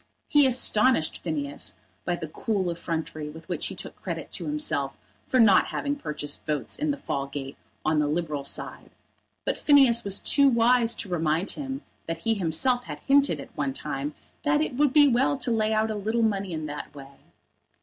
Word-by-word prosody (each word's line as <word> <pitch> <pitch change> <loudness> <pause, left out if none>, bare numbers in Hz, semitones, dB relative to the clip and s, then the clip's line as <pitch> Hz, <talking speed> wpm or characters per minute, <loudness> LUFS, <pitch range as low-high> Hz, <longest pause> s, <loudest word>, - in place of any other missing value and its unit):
He 290 -2 +5
astonished 240 -7 +2
Phineas 145 -4 -3 0.3
by 175 - 0
the 165 -2 -6
cool 190 +2 -1
effrontery 160 -2 -4
with 160 +2 -12
which - - -1
he - - -6
took - - -6
credit - - -6
to - - -5
himself 295 - -1 0.3
for 255 - +2
not 205 -5 +6
having 285 0 -2
purchased 150 - -5
votes 150 -3 -3
in 305 +1 0
the 290 - 0
Fallgate 140 - -4 0.3
on 155 0 +2
the 150 - +2
Liberal 150 -2 -2
side, 140 - -4 0.6
but - - -1
Phineas 265 -5 +5
was 200 -1 0
too 280 -1 +4
wise 235 -1 +3
to - - -5
remind 165 +1 +1
him 270 -1 -5 0.2
that 165 0 -2
he 225 - +3
himself 225 +7 +1
had - - -7
hinted 275 - +3
at - - -11
one 140 -2 -1
time 140 +2 -4 0.3
that 295 0 +2
it 310 - -1
would 290 0 +3
be 290 +1 +7
well 270 +2 +2
to 255 - -1
lay 220 -1 +1
out 220 0 +1
a - - -3
little 220 +3 0
money 200 -3 0
in 155 -2 -3
that 150 0 -7
way. 140 -1 -12
200 Hz, 190 wpm, -26 LUFS, 155-255 Hz, 0.6 s, be